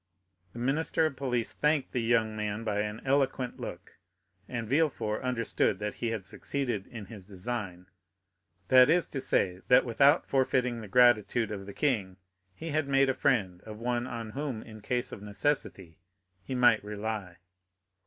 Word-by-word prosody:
The - - -11
minister 145 +6 +1
of 155 -3 -1
police 125 -4 -1
thanked 150 -2 +1
the 125 - -1
young 115 -1 +1
man 105 +1 -3
by 105 -2 -1
an 105 +1 -3
eloquent 135 -2 0
look, - - -8 0.5
and 115 -2 -4
Villefort 135 -6 0
understood 115 -5 0
that 105 +1 -3
he 120 - -3
had 110 -4 -3
succeeded 120 -7 -3
in 115 -4 -8
his 95 -2 -11
design; 95 -3 -5 0.8
that 130 +1 +7
is 175 +2 +4
to 135 - -3
say, 90 -6 +1
that 125 - +6
without 140 +6 +4
forfeiting 125 -3 +1
the 110 - -8
gratitude 115 0 +4
of 100 -2 -6
the - - -6
king, 100 -11 0 0.4
he 165 - -6
had 155 -1 0
made 135 0 +3
a - - +2
friend 95 -10 0
of 110 -1 -10
one 120 +1 -1
on 115 -3 -6
whom, 135 -3 -4
in 110 -1 -12
case 120 +3 -2
of - - -8
necessity, 100 - -2 0.4
he 130 +7 -5
might 120 -4 +4
rely. 105 -3 -5
115 Hz, 165 wpm, -29 LUFS, 105-130 Hz, 0.8 s, that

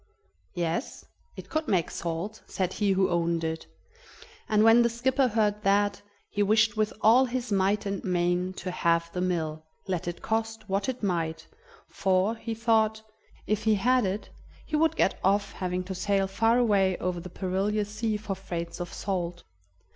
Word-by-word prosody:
"Yes, 170 - -3 0.3
it - - -9
could 310 0 -2
make 180 -5 +1
salt," 170 +6 -4
said 185 -1 -2
he 205 -2 +1
who 190 -1 +2
owned 170 -1 0
it, 160 - -3 0.8
and 215 0 +4
when 225 +2 +7
the 235 - +3
skipper 255 +3 +1
heard 210 -2 +1
that, 200 0 +2 0.3
he 205 - -1
wished 215 +1 +3
with 215 0 +1
all 240 +5 +6
his 250 -1 -3
might 200 +1 +2
and 200 -1 -3
main 180 0 0
to 185 0 -5
have 170 -1 +1
the 180 - -2
mill, 160 -4 -1 0.2
let 180 -3 -2
it 175 - -5
cost 225 -1 -2
what 195 +5 -1
it 255 -3 -5
might, 165 -4 -1 0.4
for, 190 +3 +1
he 225 0 -5
thought, 220 -1 +2 0.4
if 215 +1 -1
he 220 -1 +4
had 250 +5 +3
it, 195 +2 -3 0.3
he 310 - -3
would 320 +1 +3
get - - +1
off 200 +2 +2
having 180 0 -3
to 190 +1 -5
sail 195 +1 +1
far 225 +4 +2
away 200 -6 +3
over 180 -1 -2
the 180 +2 -8
perilous 200 +3 -1
sea 215 0 -1
for 210 -1 -4
freights 175 -3 -5
of 175 -1 -5
salt. 175 -3 -3
200 Hz, 175 wpm, -27 LUFS, 180-220 Hz, 0.8 s, when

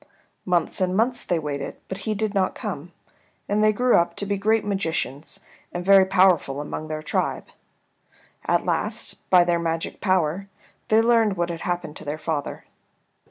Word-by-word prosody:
Months 175 0 +1
and 185 0 +1
months 245 +2 +1
they 175 - 0
waited, 145 -3 -4
but 190 - -5
he 215 - 0
did 215 0 -1
not 195 -2 +1
come, 175 - -6 0.6
and 210 +1 +1
they 215 - +5
grew 245 +4 +2
up 170 - +1
to 200 - -3
be 200 0 -1
great 215 +2 +1
magicians 165 -8 -3 0.3
and 175 0 -5
very 195 -1 +7
powerful 180 -7 +3
among 150 +1 -5
their 155 0 -5
tribe. - - -1 1.0
At - - +2
last, - - -2
by 180 -1 +7
their 175 -1 +1
magic 165 -1 -3
power, 185 -1 +1 0.4
they 220 +1 +4
learned 225 -4 +3
what 175 0 0
had 165 -1 -6
happened 175 -4 -3
to - - -10
their 145 +1 -4
father. 155 -2 -4
180 Hz, 170 wpm, -24 LUFS, 160-205 Hz, 1.0 s, very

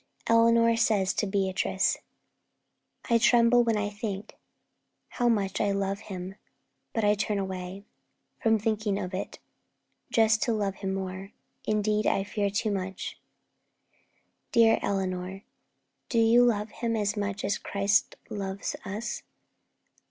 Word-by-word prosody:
Eleanor 230 0 +5
says 205 -4 +2
to 210 - -1
Beatrice: 195 -1 +1 1.1
'I 235 -2 +4
tremble 240 +1 +5
when 230 -2 +1
I 205 0 -1
think 205 0 -5 0.7
How 240 -1 +1
much 200 -4 0
I 205 - +2
love 195 0 -1
him; 190 -3 -7 0.6
but 225 - -1
I 205 0 +5
turn 205 0 -1
away 190 0 -5 0.6
From 225 -1 +4
thinking 215 -1 -1
of 185 -1 -4
it, 185 - -4 0.7
just 220 -4 +3
to 235 - +1
love 200 -3 -1
him 195 -1 -3
more; 190 +1 -5 0.3
Indeed, 215 0 +1
I 195 - +2
fear, 205 0 -1
too 210 +2 -1
much.' 190 -1 -4 1.3
'Dear 230 -2 +5
Eleanor, 190 0 -2 0.7
Do 235 - -1
you 230 +2 +6
love 210 -3 0
him 230 0 -2
as 210 -1 0
much 205 -1 -3
as 200 - 0
Christ 200 0 +1
loves 195 -1 -4
us? 210 +3 -4
205 Hz, 130 wpm, -28 LUFS, 195-225 Hz, 1.3 s, you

